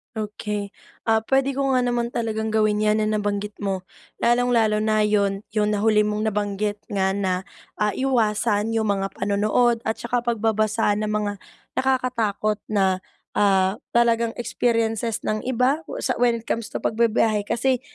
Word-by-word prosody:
Okey. 210 -1 -4 0.3
Ah, 220 0 +3
puwede 270 +2 +1
ko 275 -1 +1
nga 255 - +3
naman 240 -1 0
talagang 220 -1 -2
gawin 215 -1 +2
'yan 215 +1 +3
na 215 - +1
nabanggit 205 0 -2
mo. 190 -2 -2 0.3
Lalong-lalo 235 -3 +2
na 215 -1 +2
'yon 200 -2 +1 0.2
'yon 210 0 +2
na 205 - 0
huli 215 0 +4
mong 210 +1 -1
nabanggit 205 0 -2
nga 190 -1 +1
na, 190 -2 -1 0.3
ah, 210 0 +1
iwasan 225 -4 +1
'yong 225 - +2
mga 195 -1 -1
panonood 215 +4 +2
at 220 - 0
saka 245 0 -1
pagbabasa 220 -2 +1
ng 215 - -1
mga 210 -1 -1 0.5
nakakatakot 230 -5 0
na, 190 -3 +1 0.3
ah, 195 -1 +2 0.2
talagang 235 -1 +3
experiences 230 -2 -1
ng 215 +3 -2
iba? 260 +4 +2
O - - -6
sa 255 - -1
when 240 -1 +3
it 230 - -7
comes 230 -1 -2
to - - -6
pagbibiyahe 220 -2 +1
kasi 255 +1 +1
215 Hz, 155 wpm, -23 LUFS, 210-235 Hz, 0.5 s, huli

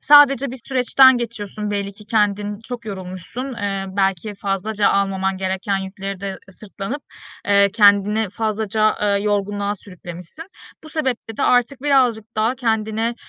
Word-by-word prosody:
Sadece 275 -2 +6
bir 260 - -7
süreçten 260 0 +5
geçiyorsun, 210 -3 -4
belli 200 -1 -2
ki 210 +2 -15
kendin 205 -1 0
çok 240 -2 -6
yorulmuşsun. 195 +7 -6
Eee, 200 -3 -2
belki 195 +1 -1
fazlaca 200 +2 0
almaman 195 -1 0
gereken 190 +1 -1
yükleri 195 0 -6
de 195 -1 -5
sırtlanıp, 205 +7 -7 0.4
eee, 200 0 +5
kendini 205 0 +4
fazlaca, 215 0 0
eee, 200 -1 +1
yorgunluğa 205 0 -1
sürüklemişsin. 180 - -10 0.4
Bu - - -10
sebeple 260 -8 -3
de - - -2
artık 250 +2 +2
birazcık 255 -7 +3
daha 225 +3 +2
kendine, 225 -1 -1
210 Hz, 135 wpm, -20 LUFS, 195-235 Hz, 0.4 s, Sadece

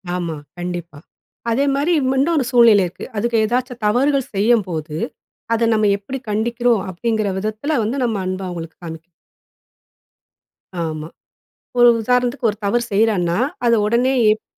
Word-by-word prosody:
ஆமா, 170 -3 -3 0.2
கண்டிப்பா. 175 -4 -5 0.5
அதே 275 +5 +2
மாரி 305 +5 +1 0.2
ம - - +2
இன்னும் 330 +4 +2
ஒரு 260 - +1
சூழ்நிலை 230 -5 +6
இருக்கு. 175 - -9
அதுக 235 +3 -1
ஏதாவது 250 +2 -1
தவறுகள் 270 +4 +1
செய்யும்போது, 185 -8 +1 0.6
அதை 230 0 +2
நம்ம 215 -1 +2
எப்படி 255 +7 -6
கண்டிக்கிறோம்? 235 0 +1
அப்படிங்க்கிற 215 +2 -1
விதத்தில 220 +9 -2
வந்து 235 +6 -2
நம்ம 220 -3 -1
அன்பை 185 +1 -3
அவங்களுக்கு 165 -2 -7
காண்பிக்கிறது. 160 -1 -7 1.8
ஆமா. 155 -1 -4 0.7
ஒரு 240 0 +7
உதாரணத்துக்கு 250 +1 +1
ஒரு 210 - -12
தவறு 235 +4 +1
செய்றான்னா, 195 -5 +2 0.3
அதை 235 -1 +5
உடனே 245 +4 +2 0.2
ஏப் 215 +1 +1
220 Hz, 135 wpm, -19 LUFS, 185-245 Hz, 1.8 s, ஒரு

